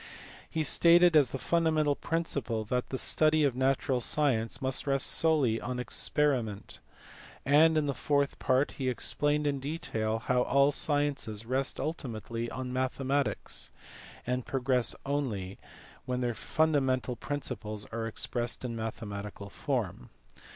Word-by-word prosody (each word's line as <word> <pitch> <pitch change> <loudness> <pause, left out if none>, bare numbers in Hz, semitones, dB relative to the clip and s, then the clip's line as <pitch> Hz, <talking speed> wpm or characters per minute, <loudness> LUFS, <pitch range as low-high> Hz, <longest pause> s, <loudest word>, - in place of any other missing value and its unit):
He 160 - -1
stated 170 +2 +5
as 145 -5 +6
the 135 - -4
fundamental 155 -1 +2
principle 140 -10 -2
that 125 +3 -1
the 130 - -2
study 155 +3 +2
of 135 -4 +2
natural 130 -1 +1
science 120 -4 +1
must 130 +1 -2
rest 135 -1 +2
solely 145 -9 +2
on 125 +1 -3
experiment; 125 -4 -1 0.7
and 155 +3 +5
in 155 - +2
the 140 - 0
fourth 140 0 0
part 130 +2 +2
he 130 -1 0
explained 145 +4 0
in 140 -1 0
detail 115 -7 -2
how 125 +2 +1
all 140 +3 +4
sciences 145 -8 0
rest 130 +3 -2
ultimately 120 -6 -4
on 130 0 -5
mathematics, 135 +2 -1 0.6
and 125 0 -2
progress 130 -2 +1
only 115 -10 -2 0.5
when 125 0 -2
their 120 -1 0
fun 160 +7 +1
damental 130 -3 +1
principles 115 -8 -4
are 115 0 -3
expressed 120 +2 -3
in 125 - -3
a - - -5
mathematical 105 -2 -6
form. 115 - -3
130 Hz, 135 wpm, -30 LUFS, 115-145 Hz, 0.7 s, as